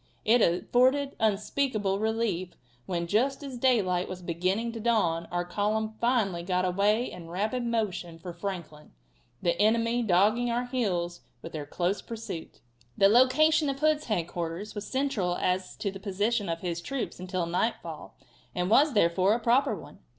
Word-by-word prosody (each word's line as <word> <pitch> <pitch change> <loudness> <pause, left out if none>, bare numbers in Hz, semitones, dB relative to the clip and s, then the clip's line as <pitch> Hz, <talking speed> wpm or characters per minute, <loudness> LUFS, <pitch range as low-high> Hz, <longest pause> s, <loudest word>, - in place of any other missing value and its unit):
It 235 +2 +5
afforded 255 +11 +2
unspeakable 215 -1 0
relief 215 -5 -1 0.3
when, 170 -2 -1
just 255 - +1
as 265 -3 -7
daylight 195 -9 +2
was 185 -1 -7
beginning 185 +7 -1
to 230 - -7
dawn, 190 -8 +1
our 175 0 -1
column 215 +4 -1
finally 225 -8 +1
got 180 +1 0
away 205 +6 +1
in 165 -2 -10
rapid 215 +8 -1
motion 200 -8 -2
for 175 +1 -8
Franklin, 170 -5 -7 0.5
the 170 -1 +2
enemy 230 +2 +3
dogging 215 +4 +3
our 240 +1 0
heels 180 -9 -2 0.2
with 165 - -7
their 150 -2 -6
close 180 +6 -1
pursuit. 220 -8 -7 0.4
The 195 - +6
location 275 +6 +4
of 275 - -2
Hood's 305 +1 +2
headquarters 175 0 -3
was 205 -1 -6
central 260 -10 0
as 185 +1 -1
to 200 - -3
the 195 - -9
position 205 +1 -1
of 165 0 -3
his 170 -2 -3
troops 270 0 -4
until 185 -1 -2
nightfall, 180 +7 -3 0.4
and 180 +2 -1
was, 285 +2 +5
therefore, 185 +2 +3
a - - -2
proper 245 +5 +2
one. - - -12
205 Hz, 160 wpm, -28 LUFS, 180-235 Hz, 0.5 s, The